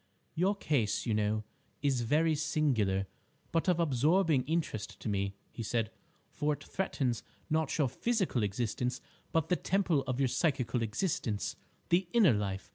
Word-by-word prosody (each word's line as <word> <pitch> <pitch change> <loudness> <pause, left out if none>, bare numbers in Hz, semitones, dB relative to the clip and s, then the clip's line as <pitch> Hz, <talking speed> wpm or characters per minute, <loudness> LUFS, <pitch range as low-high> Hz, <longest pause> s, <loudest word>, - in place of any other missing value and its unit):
"Your 190 +5 +2
case, 120 - 0
you 115 - +1
know, 105 0 +1 0.4
is 135 -4 +2
very 155 +7 +3
singular, 125 -11 +1 0.5
but 165 +2 +1
of 175 -1 +3
absorbing 155 0 +3
interest 155 -9 -2
to - - -5
me," 100 -1 -1 0.2
he - - -6
said, 115 0 -1 0.4
"for 150 0 0
it - - -8
threatens, 135 -11 -1 0.3
not 155 -2 +1
your 150 -4 +3
physical 190 - 0
existence 120 +4 -1 0.3
but 160 -1 +1
the 180 - +4
temple 185 -6 +1
of 130 0 -1
your 135 - +3
psychical 125 -3 0
existence—the 120 - -1
inner 210 - +6
life. 100 -2 -2
135 Hz, 145 wpm, -32 LUFS, 110-165 Hz, 0.5 s, inner